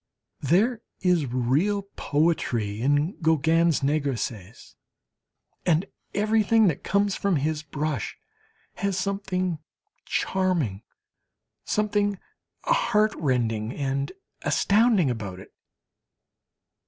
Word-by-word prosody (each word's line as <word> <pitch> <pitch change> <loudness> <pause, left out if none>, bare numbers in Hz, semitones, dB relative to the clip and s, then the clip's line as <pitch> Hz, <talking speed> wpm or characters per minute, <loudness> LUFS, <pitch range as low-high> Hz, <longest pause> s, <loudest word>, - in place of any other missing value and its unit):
There 210 - +2 0.2
is 180 -6 +2
real 135 +12 +1
poetry 120 -9 0
in 145 - +1
Gauguin's 160 0 +3
negresses. 130 -8 -2 0.9
And 170 +2 +2 0.3
everything 215 +1 +3
that 145 - -4
comes 200 0 +1
from 200 -3 +1
his 150 +1 -1
brush 150 -4 -3 0.6
has 200 -2 -1
something 185 -3 -1 0.5
charming, 170 - 0 0.8
something 205 -1 +1 0.5
heartrending 135 - +1
and 140 0 -2 0.3
astounding 205 - +3
about 100 -6 -5
it. - - -14
160 Hz, 80 wpm, -25 LUFS, 135-200 Hz, 0.9 s, Gauguin's